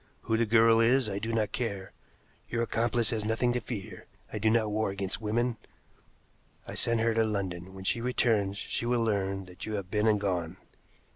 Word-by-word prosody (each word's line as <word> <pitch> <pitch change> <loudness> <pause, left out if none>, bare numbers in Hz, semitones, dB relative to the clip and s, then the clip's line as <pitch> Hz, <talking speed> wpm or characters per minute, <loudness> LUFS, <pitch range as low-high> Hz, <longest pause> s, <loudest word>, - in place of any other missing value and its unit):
Who 110 - 0
the 115 0 +1
girl 115 +1 +5
is, 120 +2 +4
I 100 -1 -2
do 110 +2 -3
not 110 -2 0
care. 100 -6 -3 0.6
Your 115 0 0
accomplice 115 0 +1
has 110 -2 -1
nothing 115 +3 +1
to 125 - 0
fear 105 -3 -7 0.3
I 105 - -2
do 110 +2 +3
not 110 -1 +2
war 110 0 0
against 100 +2 -3
women. 115 +2 0 1.1
I - - -6
sent 115 -1 +2
her 115 0 +2
to 115 0 +3
London. 95 -4 -3
When 95 - -8
she 115 +4 0
returns 110 -5 +1
she 120 - -3
will 120 -1 +2
learn 95 -3 -1
that 90 +2 -9
you 110 - -2
have 95 -2 -5
been 105 +1 +2
and 105 -1 +4
gone. 90 -3 -2
110 Hz, 200 wpm, -29 LUFS, 100-115 Hz, 1.1 s, girl